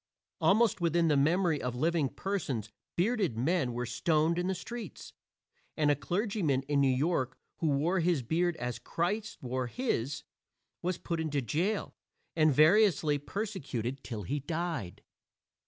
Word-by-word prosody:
Almost 215 -1 +3
within 170 0 +3
the 150 - +4
memory 160 +2 +2
of 125 -1 -3
living 155 +1 +1
persons 135 - -3 0.2
bearded 195 - +1
men 135 +1 +1
were 120 +1 -3
stoned 155 +7 +1
in 180 - -1
the 190 - 0
streets; 220 +2 -8 0.6
and 150 -1 +3
a - - +3
clergyman 175 - 0
in 140 0 +1
New 140 - +4
York 130 -1 0 0.2
who 165 - 0
wore 155 +6 +2
his 165 -5 +1
beard 170 +7 +1
as 125 -5 -4
Christ 205 +6 -2
wore 130 0 -2
his, 140 - -2 0.6
was 180 0 -1
put 170 -2 -3
into 155 -3 0
jail 170 - -1 0.4
and 155 -2 +4
variously 155 -1 +4
persecuted 140 - -4
till 110 -3 -5
he 145 +11 -2
died. 155 - -4
160 Hz, 145 wpm, -31 LUFS, 135-180 Hz, 0.6 s, the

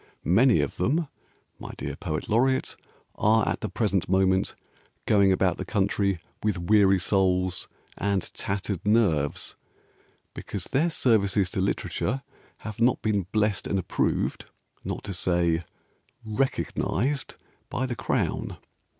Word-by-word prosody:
Many 115 +9 +5
of - - -3
them, 155 +4 +1 0.5
my - - -8
dear - - -4
Poet 75 - -4
Laureate, 130 +4 +1 0.4
Are 110 +2 +3
at - - -1
the - - -3
present 100 -5 0
moment 95 0 +2 0.5
Going 100 -2 +4
about 95 -1 +2
the - - -4
country 100 -2 0 0.2
With 105 -3 0
weary 95 +2 +4
souls 90 -1 +1 0.3
and 100 -1 -1
tattered 100 -2 -3
nerves 100 -10 +1 0.8
Because 100 -4 -5
their 150 - +1
Services 100 - +2
to 95 - -1
Literature 125 +6 -1 0.4
Have 105 +1 -7
not 125 +2 +3
been 100 -4 0
blessed 105 -2 +1
and 100 - 0
approved, 95 - -1 0.4
Not - - -4
to 100 - -5
say 85 -2 +1 0.6
"recognised," 130 +2 -1 0.3
By 130 - -1
the 125 -2 -3
Crown. - - -1
100 Hz, 125 wpm, -26 LUFS, 95-115 Hz, 0.8 s, Many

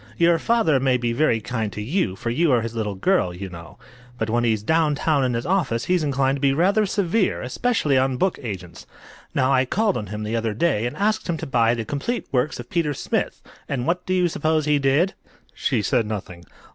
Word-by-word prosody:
"Your 170 -1 +4
father 170 - +2
may 130 -1 +2
be 120 -1 -1
very 120 -3 +2
kind 110 -1 -3
to - - -6
you, 110 - -1
for 115 - -3
you 160 +5 +2
are 120 -2 +3
his 115 0 -4
little 105 -3 -3
girl, 95 - +1
you 95 +1 -6
know. 85 -1 -11 0.4
But 110 -2 -2
when 120 +1 +1
he's 110 -3 +1
down 160 +3 +2
town 145 -1 +1
in 125 -2 0
his 115 - -3
office 170 -11 0
he's 180 -1 +2
inclined 135 -1 +1
to - - -10
be 140 -1 +3
rather 200 +7 +2
severe, 195 +1 0
especially 145 - +1
on 130 -1 0
book 190 +6 0
agents. 90 -7 -7 0.5
Now, 130 +1 +3
I 130 -1 +4
called 210 - +1
on 105 -3 -5
him 105 +2 -5
the 110 +2 -2
other 115 -2 -1
day 120 -5 +1
and 120 - -7
asked 215 0 0
him 165 - 0
to - - -5
buy 120 -2 +2
the 115 -2 -4
'Complete 145 - -3
Works 125 +1 0
of 120 - -7
Peter 160 -4 0
Smith,' - - -2 0.3
and 125 -3 -2
what 180 +3 0
do 185 - +1
you 180 -1 +3
suppose 155 -1 0
he 150 -1 +3
did?" 140 +7 +2 0.4
She 105 - -1
said 110 +3 +1
nothing. 90 -5 -6
135 Hz, 225 wpm, -23 LUFS, 115-170 Hz, 0.5 s, Your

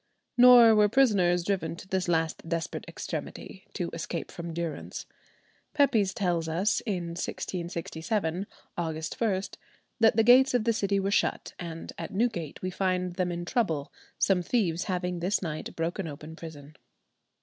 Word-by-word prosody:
Nor 245 -2 +9
were 210 -1 +5
prisoners 200 -9 +3
driven 170 -4 -1
to 190 - -12
this 190 -1 -1
last 165 -1 -1
desperate 165 0 -3
extremity 190 - -7
to 175 -4 -3
escape 165 +1 -4
from 170 -1 -6
durance. 165 -2 -5 0.7
Pepys 240 -10 +3
tells 175 -5 -1
us 190 +6 +1
in 180 -5 -2
1667, 170 +2 -3 0.3
August 160 -1 -4
1, 200 -5 +2 0.6
that 225 -2 +5
the 225 - +4
gates 255 +3 +6
of 240 - +2
the 230 0 +2
city 200 -2 +1
were 195 +1 -1
shut, - - 0
"and 165 -2 -7
at 165 - -4
Newgate 195 - -1
we 185 - -2
find 185 -1 -1
them 180 -1 -1
in 175 0 -4
trouble, 165 - -1 0.2
some 190 -2 +3
thieves 175 -4 0
having 180 -2 -2
this 185 +3 0
night 155 -2 -5
broken 165 +2 -2
open 155 +2 -8
prison." 155 -3 -10
180 Hz, 150 wpm, -28 LUFS, 165-205 Hz, 0.7 s, Nor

